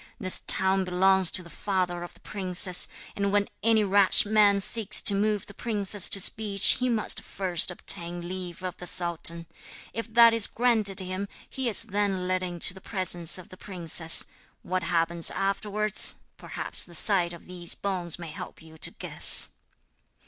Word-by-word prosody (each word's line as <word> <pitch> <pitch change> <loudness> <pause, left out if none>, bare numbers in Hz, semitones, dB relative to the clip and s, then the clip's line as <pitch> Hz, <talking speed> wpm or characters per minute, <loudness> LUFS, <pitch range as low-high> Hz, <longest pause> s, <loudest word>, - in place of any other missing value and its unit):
This 185 -4 -2
town 190 0 +4
belongs 185 0 +2
to 185 - -1
the 170 - -15
father 180 -1 -3
of 175 - -11
the - - -19
princess, 185 -2 0 0.3
and 200 0 -2
when 205 0 0
any 220 -1 +2
rash 200 0 +4
man 205 -1 +2
seeks 215 +1 +4
to - - +5
move 210 0 -2
the 200 - -13
princess 205 -3 0
to 195 - -1
speech 200 0 +1
he 255 0 -1
must 225 -3 0
first 185 -4 -1
obtain 175 -1 -3
leave 180 -1 -8
of 185 -1 -6
the 180 - -10
sultan. 170 -1 0 0.5
If 230 0 -7
that 235 -1 +6
is 230 -2 +4
granted 220 -5 +1
him 185 +2 -6 0.2
he 265 -2 -4
is 225 - +4
then 200 -3 -3
led 185 0 -2
into 175 -1 -1
the 190 - -15
presence 180 -5 +1
of 185 - -11
the 185 - -14
princess. 170 -4 +2 0.4
What 185 +1 -3
happens 170 0 +2
afterwards, 210 +1 0 0.2
perhaps - - -5
the 175 - -8
sight 180 -2 +3
of 170 - -12
these 175 -1 -1
bones 180 -4 -5
may 170 -2 -10
help - - -10
you 160 -1 -17
to - - 0
guess.' - - +2
190 Hz, 170 wpm, -25 LUFS, 175-205 Hz, 0.5 s, that